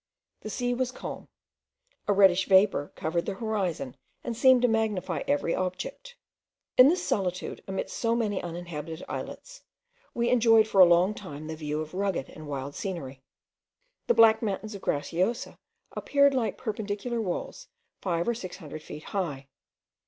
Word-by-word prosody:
The 215 Hz, -, -7 dB
sea 245 Hz, +3 st, -1 dB
was 250 Hz, 0 st, -1 dB
calm; -, -, -7 dB, 0.8 s
a 205 Hz, -, +4 dB
reddish 190 Hz, -2 st, +5 dB
vapour 190 Hz, -6 st, +4 dB
covered 170 Hz, +2 st, -2 dB
the 200 Hz, -, -2 dB
horizon, 195 Hz, -, -2 dB, 0.3 s
and 235 Hz, -, -3 dB
seemed 255 Hz, +1 st, +5 dB
to -, -, +6 dB
magnify 220 Hz, -4 st, 0 dB
every 285 Hz, -12 st, +1 dB
object. 485 Hz, -, -4 dB, 0.6 s
In 255 Hz, -, +9 dB
this 355 Hz, +2 st, 0 dB
solitude, 180 Hz, -3 st, -2 dB
amidst 190 Hz, 0 st, -4 dB
so 230 Hz, 0 st, +1 dB
many 215 Hz, -4 st, 0 dB
uninhabited 165 Hz, -2 st, -6 dB
islets, -, -, -7 dB, 0.5 s
we 235 Hz, 0 st, +1 dB
enjoyed 225 Hz, -3 st, +5 dB
for 195 Hz, -3 st, +5 dB
a -, -, +11 dB
long 175 Hz, +4 st, +4 dB
time 155 Hz, -8 st, -8 dB
the 160 Hz, 0 st, -5 dB
view 150 Hz, -1 st, -3 dB
of 155 Hz, +1 st, -7 dB
rugged 190 Hz, -7 st, -1 dB
and 155 Hz, -1 st, -11 dB
wild 140 Hz, 0 st, -4 dB
scenery. 140 Hz, -9 st, -5 dB, 0.9 s
The 475 Hz, -, +3 dB
black 220 Hz, -1 st, +6 dB
mountains 215 Hz, 0 st, -3 dB
of 200 Hz, -, -8 dB
Graciosa 180 Hz, -, -1 dB, 0.3 s
appeared 280 Hz, -1 st, +3 dB
like 250 Hz, -4 st, -1 dB
perpendicular 220 Hz, +1 st, -3 dB
walls 220 Hz, -, -4 dB, 0.3 s
five 170 Hz, -2 st, -1 dB
or 235 Hz, -, +2 dB
six 185 Hz, -6 st, -7 dB
hundred 155 Hz, -3 st, -9 dB
feet 150 Hz, 0 st, -9 dB
high. 145 Hz, -9 st, -4 dB
195 Hz, 155 wpm, -28 LUFS, 170-230 Hz, 0.9 s, a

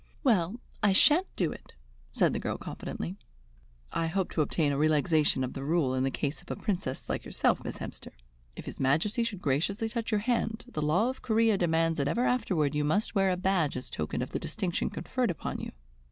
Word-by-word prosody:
"Well, 215 Hz, -, +2 dB, 0.2 s
I 205 Hz, -2 st, +4 dB
shan't 310 Hz, -, +5 dB
do 175 Hz, -4 st, 0 dB
it," -, -, -12 dB, 0.3 s
said -, -, +2 dB
the -, -, -1 dB
girl -, -, -2 dB
confidently. 85 Hz, +5 st, -6 dB, 0.7 s
"I 165 Hz, -, 0 dB
hope 190 Hz, +2 st, -1 dB
to 160 Hz, -, +1 dB
obtain 150 Hz, 0 st, +1 dB
a 140 Hz, -, 0 dB
relaxation 155 Hz, -2 st, +3 dB
of 125 Hz, -, -3 dB
the 135 Hz, -, -5 dB
rule 150 Hz, -3 st, +1 dB
in 130 Hz, 0 st, +1 dB
the 135 Hz, -, +2 dB
case 140 Hz, +3 st, -3 dB
of -, -, -19 dB
a -, -, -2 dB
Princess 180 Hz, -, -3 dB
like -, -, -2 dB
yourself, -, -, +1 dB
Miss -, -, -5 dB
Hemster. -, -, -8 dB, 0.4 s
If -, -, -8 dB
his -, -, -8 dB
Majesty 160 Hz, -, +2 dB
should 205 Hz, -5 st, -4 dB
graciously 180 Hz, +11 st, 0 dB
touch 230 Hz, 0 st, -3 dB
your 210 Hz, -2 st, +1 dB
hand, 225 Hz, -1 st, -1 dB
the 155 Hz, -, -4 dB
law 175 Hz, +11 st, +2 dB
of 260 Hz, -, -12 dB
Corea 225 Hz, -2 st, +3 dB
demands 165 Hz, -3 st, +1 dB
that 140 Hz, -, +1 dB
ever 235 Hz, -, +1 dB
afterward 185 Hz, -, +1 dB
you 150 Hz, 0 st, +1 dB
must 200 Hz, +9 st, +1 dB
wear 195 Hz, -2 st, +3 dB
a 180 Hz, -, +1 dB
badge 180 Hz, -7 st, +1 dB
as 125 Hz, -, -7 dB
token 80 Hz, +10 st, -2 dB
of 125 Hz, -, -7 dB
the -, -, -2 dB
distinction 175 Hz, +2 st, -2 dB
conferred 255 Hz, -3 st, -1 dB
upon 175 Hz, -, -3 dB
you." -, -, -5 dB
175 Hz, 210 wpm, -29 LUFS, 150-215 Hz, 0.7 s, shan't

